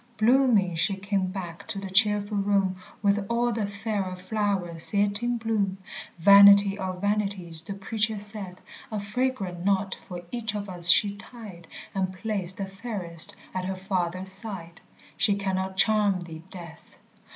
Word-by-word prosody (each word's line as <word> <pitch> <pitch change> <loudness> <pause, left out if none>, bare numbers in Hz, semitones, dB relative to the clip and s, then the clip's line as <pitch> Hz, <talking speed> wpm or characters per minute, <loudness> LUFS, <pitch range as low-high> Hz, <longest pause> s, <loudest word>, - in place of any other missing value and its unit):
Blooming 225 -5 +3
she 170 +4 +1
came 195 -1 -2
back 180 -3 -7
to - - -3
the 195 -1 -6
cheerful 205 +1 +3
room 195 -2 +1 0.3
With 200 0 +2
all 240 +1 +1
the 215 -2 -2
fairer 200 -2 -4
flowers 185 -3 +1
yet 205 +1 +1
in 240 0 -1
bloom 215 -4 -1 0.4
Vanity 200 +2 +7
of 185 -1 -5
vanities 200 -5 -2
the 195 +4 -7
Preacher 215 +2 -1
saith 200 -3 -6 0.3
A 215 - -3
fragrant 200 -4 -3
knot 195 0 0
for 175 -1 -9
each 225 -3 -3
of 205 -1 -5
us 175 -2 0
she 200 +2 +5
tied, 200 -6 -12 0.3
And 190 -1 -1
placed 190 -1 -4
the 195 - -3
fairest 195 -3 +2 0.2
at 185 -1 -3
her 190 +1 -3
Father's 185 0 -1
side 190 -4 -2 0.4
She 205 -3 +2
cannot 190 -1 -3
charm 205 -3 +2
thee, 165 -2 -9
Death. 170 -4 -12
200 Hz, 150 wpm, -26 LUFS, 185-210 Hz, 0.4 s, Vanity